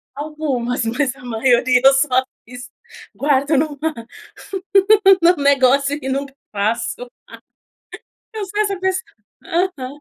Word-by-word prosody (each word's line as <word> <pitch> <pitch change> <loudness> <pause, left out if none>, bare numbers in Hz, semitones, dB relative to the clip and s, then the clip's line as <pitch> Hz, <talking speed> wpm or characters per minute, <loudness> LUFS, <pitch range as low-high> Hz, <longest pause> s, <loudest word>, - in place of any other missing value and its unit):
Algumas, 275 -5 -3
mas 255 +3 -1
a 250 - -15
maioria 245 +1 +2
eu 270 - +7
só 260 -2 +2 0.2
fiz, 250 +1 -11 0.4
guardo 285 +1 +1
numa 290 0 -1 1.4
no 350 +1 +5
negócio 280 +1 +3
e 265 - -4
não 275 +1 -2 0.3
faço, 220 +4 -2 1.3
eu 425 -2 -4
sou 415 +2 -5
essa 400 -3 -2
pessoa. 375 0 -1 0.4
Aham. 345 -6 -2
275 Hz, 115 wpm, -19 LUFS, 250-305 Hz, 1.4 s, eu